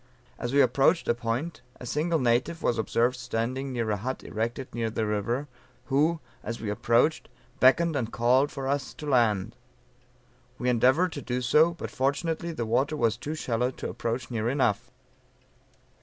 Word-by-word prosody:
"As 120 - -3
we 140 +1 +5
approached 135 +7 +3
a - - +4
point, 120 +7 -3 0.2
a - - -8
single 160 +6 0
native 130 +6 +1
was 115 - +1
observed 120 +3 +1
standing 125 +2 -3
near 115 -3 -1
a 105 - 0
hut 130 +6 -4
erected 115 +4 -4
near 115 -1 -1
the 110 0 -2
river, 110 +7 -1 0.5
who, 160 +4 +3 0.2
as 115 0 -5
we 105 -2 -3
approached, 120 +8 +1 0.3
beckoned, 160 +5 +4
and 120 -5 -2
called 130 +5 +3
for 135 -1 -5
us 140 0 -2
to 150 - -8
land. 115 -6 +2 1.0
We 125 - -1
endeavored 130 +9 +3
to 145 - -6
do 125 0 -2
so, 155 +7 +4
but - - -6
fortunately 160 +5 -1
the 120 -8 -3
water 130 +7 +1
was 115 -5 +2
too 145 +7 -5
shallow 125 -4 0
to 130 - -6
approach 120 +2 -3
near 115 -1 -1
enough. 125 -6 0
125 Hz, 170 wpm, -27 LUFS, 115-145 Hz, 1.0 s, we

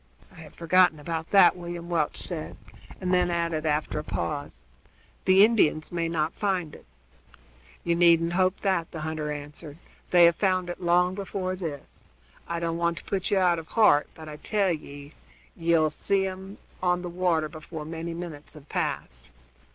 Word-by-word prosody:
"I - - -18
had 155 -2 -13
forgotten 170 -1 +3
about 160 +1 -4
that," 185 -4 +6
William 175 -1 -7
Welch 165 -4 -1
said, 165 -4 -4 0.4
and 185 -1 -1
then 180 -1 +3
added, 170 -2 -1
after 150 0 -1
a - - -5
pause: 145 - -4 0.6
"The 190 +2 +7
Indians 180 -9 +1
may 170 -1 -1
not 160 0 -1
find 185 -7 -1
it." - - -14 1.0
"You 170 - +1
needn't 170 -1 +4
hope 185 +1 +1
that," 185 -5 0
the 160 - -7
hunter 155 -1 -3
answered; 150 +1 -7 0.3
"they 175 -1 +7
have 170 0 +5
found 185 -3 0
it 175 - -9
long 180 +1 +3
before 190 -1 -3
this. 160 -6 -7 0.4
I 170 0 -2
don't 165 0 -2
want 170 0 0
to - - -7
put 195 -2 -2
you 200 - +2
out 175 -3 +3
of 160 - -10
heart; 210 -10 +4
but 160 -1 -11
I 150 -1 -8
tell 200 +3 0
ye 145 -2 -7 0.4
ye'll 165 -2 +2
see 195 +5 0
them 190 +1 -6 0.2
on 180 0 +1
the - - -4
water 175 -3 0
before 155 0 -8
many 165 +1 -5
minutes 165 -3 -8
have 150 -1 -14
passed." - - -4
170 Hz, 175 wpm, -26 LUFS, 155-185 Hz, 1.0 s, The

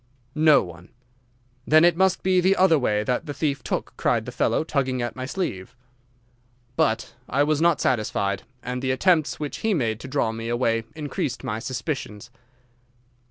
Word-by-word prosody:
"'No 155 -1 +5
one.' 90 0 -12 0.8
"'Then 155 +2 +6
it 175 -1 +4
must 190 +1 +2
be 185 -1 +3
the 190 +2 +3
other 185 -5 +4
way 105 -5 +1
that 125 +8 -2
the 145 - -5
thief 140 -2 -1
took,' - - -3
cried - - +1
the - - -6
fellow, - - +1
tugging 135 -5 -1
at 120 0 -3
my 130 0 -5
sleeve. 125 - -4 1.0
"'But 115 0 0 0.2
I 140 - +2
was 150 +1 +1
not 170 -2 +3
satisfied, 100 -4 0 0.2
and 125 +1 -4
the 130 - -2
attempts 155 +3 +2
which 150 -2 -4
he 220 -2 0
made 115 -7 -1
to - - -8
draw 130 -4 0
me 115 +1 -5
away 115 -2 0
increased 145 -4 -4
my 105 +1 -3
suspicions. 120 -2 -5
130 Hz, 170 wpm, -24 LUFS, 115-155 Hz, 1.0 s, Then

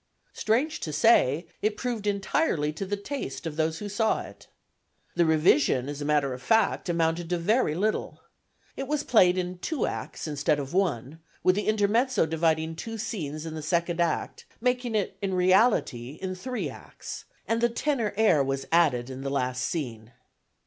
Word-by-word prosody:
Strange 265 +9 0
to 155 - -4
say, 155 - +4 0.2
it 210 0 0
proved 235 -5 -3
entirely 195 - 0
to 190 +5 -5
the 205 +1 -1
taste 200 - -5
of 160 -2 -4
those 160 0 0
who 210 - -5
saw 215 +2 +1
it. - - -12 0.7
The 170 -1 +2
revision, 150 -5 +3
as 145 0 -5
a - - -3
matter 145 -3 +2
of 125 - -8
fact, 200 - +2
amounted 165 0 0
to 175 - +1
very 185 -1 +1
little. 210 +5 -1 0.6
It 270 - -4
was 295 0 0
played 185 -6 +4
in 180 0 -3
two 295 - -1
acts - - -5
instead 150 0 +1
of 140 0 -5
one, 160 - -1 0.2
with 185 - +5
the 205 +2 -2
intermezzo 220 +2 +2
dividing 160 0 0
two 225 +5 -5
scenes 160 - -4
in 160 - -5
the 160 - -5
second 170 +2 0
act, 170 -2 -1
making 245 -1 0
it, 205 -3 -1
in 195 -2 -1
reality, 180 - +2
in 185 -1 -3
three 250 +7 -4
acts, - - -9 0.2
and 230 0 0
the 235 - +4
tenor 235 -3 -1
air 180 -10 +4
was 135 0 -2
added 135 -7 +3
in 130 +1 -7
the 135 - -3
last 130 -2 -1
scene. 120 -8 -4
175 Hz, 175 wpm, -27 LUFS, 150-215 Hz, 0.7 s, with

